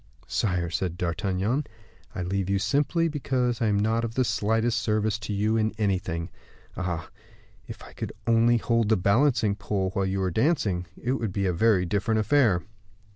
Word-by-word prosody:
"Sire," 90 -5 -1
said 90 0 -2
D'Artagnan, 95 - -1 0.5
"I 90 - -2
leave 95 +1 -2
you 100 - +2
simply 150 - +1
because 130 -5 -1
I 115 - +2
am 105 -1 +2
not 110 +2 +1
of 115 0 -4
the 130 - +3
slightest 110 +2 +1
service 110 -1 0
to 110 0 -6
you 105 +2 +1
in 110 -1 +1
anything. 95 -5 -1 0.4
Ah! 85 -4 -4 0.6
if - - -9
I - - -13
could - - -5
only 115 +1 +4
hold 115 -1 +1
the 110 - +4
balancing 110 +3 +3
pole 100 -2 -2
while 95 0 -1
you 95 +1 -1
were 95 -1 0
dancing, 110 - +1
it 120 - -2
would 115 -6 -1
be 100 +1 -1
a 90 - +1
very 95 0 +3
different 105 +4 0
affair." 110 -6 +3
105 Hz, 180 wpm, -26 LUFS, 95-115 Hz, 0.6 s, only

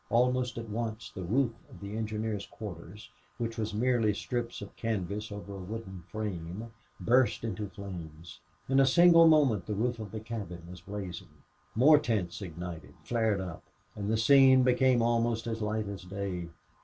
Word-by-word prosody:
Almost 125 +1 +2
at 115 0 -5
once 110 +1 -4
the 95 - -6
roof 115 +7 +1 0.2
of - - -13
the 100 +1 -6
engineers' 110 -2 -3
quarters, 105 0 -9 0.3
which 115 -1 -3
was 110 0 -1
merely 115 -1 +2
strips 120 +2 -3
of 100 - -9
canvas 105 -1 -3
over 100 -1 -7
a 100 - -7
wooden 95 -1 -7
frame, 105 +1 -5 0.3
burst 125 0 +3
into 105 -2 -3
flames. 85 -5 -9 0.3
In 135 +1 +3
a 135 - +6
single 165 +3 +7
moment 140 - +4
the 105 - -2
roof 120 +3 -1
of 110 -2 -6
the 110 - -4
cabin 105 -6 -6
was 90 0 -10
blazing. 95 -3 -8 0.3
More 145 +6 +7
tents 105 - -2
ignited, 85 -2 -7
flared 110 -4 +1
up, 90 -3 -6 0.3
and 100 0 -3
the 110 - +2
scene 130 +2 +7
became 125 -1 +4
almost 115 -1 +1
as 115 -1 -3
light 105 0 -1
as 100 -1 -6
day. 90 -2 -4
110 Hz, 165 wpm, -30 LUFS, 100-120 Hz, 0.3 s, single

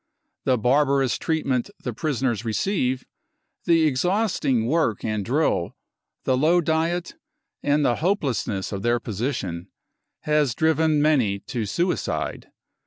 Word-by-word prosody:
The 130 -1 +3
barbarous 135 +2 +2
treatment 140 -7 -1
the 125 - -3
prisoners 125 -4 -1
receive, 130 - -1 0.6
the 165 -1 +4
exhausting 155 - +1
work 130 -6 0
and 105 -2 -1
drill, 125 - 0 0.5
the 130 - +2
low 160 +7 +3
diet, 165 +2 0 0.5
and 145 0 +2
the 120 - +2
hopeless 160 - 0
ness 95 -3 -3
of 100 -2 -4
their 120 +3 +1
position 100 -6 -3 0.5
has 150 -5 +1
driven 160 -1 +2
many 130 -10 +2
to 115 -5 -4
suicide. 175 - -2
135 Hz, 120 wpm, -24 LUFS, 120-160 Hz, 0.6 s, the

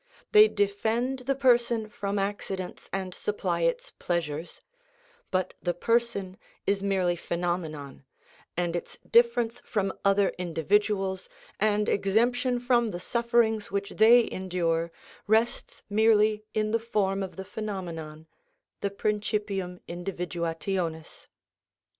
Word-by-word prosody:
They 425 -1 +9
defend 220 - 0
the 275 - +3
person 240 -4 +3
from 205 -2 -3
accidents 195 -2 -4
and 190 -1 -3
supply 430 - -2
its - - 0
pleasures; 165 -2 -3 0.7
but 185 -1 -1
the 175 -1 -1
person 215 -3 0 0.3
is 200 0 +1
merely 190 -3 +1
phenomenon, 165 -6 -4 0.5
and 175 -1 0
its 175 - -5
difference 235 0 +3
from 195 -5 -1
other 200 0 +4
individuals, 190 +3 0 0.3
and 210 0 +2
exemption 245 +5 +2
from 240 -1 +2
the 180 -5 -4
sufferings 235 0 +1
which 200 0 -2
they 230 +2 +6
endure, 170 -3 -1 0.4
rests 220 +3 +1
merely 215 0 +3
in 215 0 +1
the 230 - +2
form 200 -4 0
of 190 - -5
the 190 - -6
phenomenon, 170 -8 -6 0.5
the 200 - -1
principium 200 -3 -2
individuationis. 170 -1 -3
200 Hz, 110 wpm, -28 LUFS, 180-225 Hz, 0.7 s, They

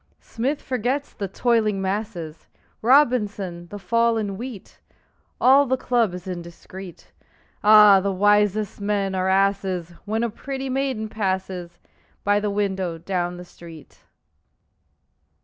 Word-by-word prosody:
Smith 265 +6 -3
forgets 260 +3 -2
the 200 - -4
"toiling 215 0 +1
masses," 190 -5 -4 0.3
Robinson, 210 -9 +2
the 205 - -8
fall 230 +4 +1
in 205 -3 -3
wheat; 230 -2 -9 0.6
All 275 +2 +5
the 260 +1 +1
club 235 -7 0
is 180 - -9
indiscret. 180 +1 -9 0.5
Ah, 210 -2 +8
the 200 +1 -1
wisest 205 +1 +2
men 200 -1 -1
are 185 0 0
asses 190 -3 0
When 220 +2 -1
a 235 - -1
pretty 270 +3 -5
maiden 260 -5 -1
passes 190 -4 -3 0.5
By 205 0 +3
the 210 0 -2
window 190 -4 -2
down 175 0 -3
the 180 - -9
street! 165 -3 -14
205 Hz, 125 wpm, -23 LUFS, 185-230 Hz, 0.6 s, Ah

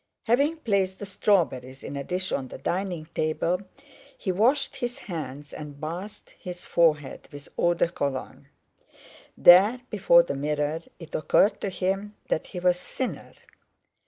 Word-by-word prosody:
Having 280 +8 +2
placed 195 -5 +1
the 205 - -6
strawberries 135 - 0
in - - -6
a 140 - -3
dish 185 +4 -3
on 130 - -1
the - - -9
dining 175 +3 -2
table, 165 +4 0 0.6
he 190 - -2
washed 255 +9 +2
his 245 0 -3
hands 145 -5 -7
and 150 -2 -8
bathed 175 +7 -6
his 180 -1 -8
forehead 150 -4 +1
with 145 0 -10
eau 175 0 +2
de 170 - +2
Cologne. 140 -6 -4 0.9
There, 200 +8 +7
before 170 -5 +6
the 170 - -3
mirror, 150 +2 -1 0.2
it 165 -2 -12
occurred 200 +6 +3
to 200 - -1
him 195 +3 -2
that - - 0
he 180 - -6
was 180 0 +2
thinner. 260 - -5
175 Hz, 150 wpm, -26 LUFS, 150-200 Hz, 0.9 s, There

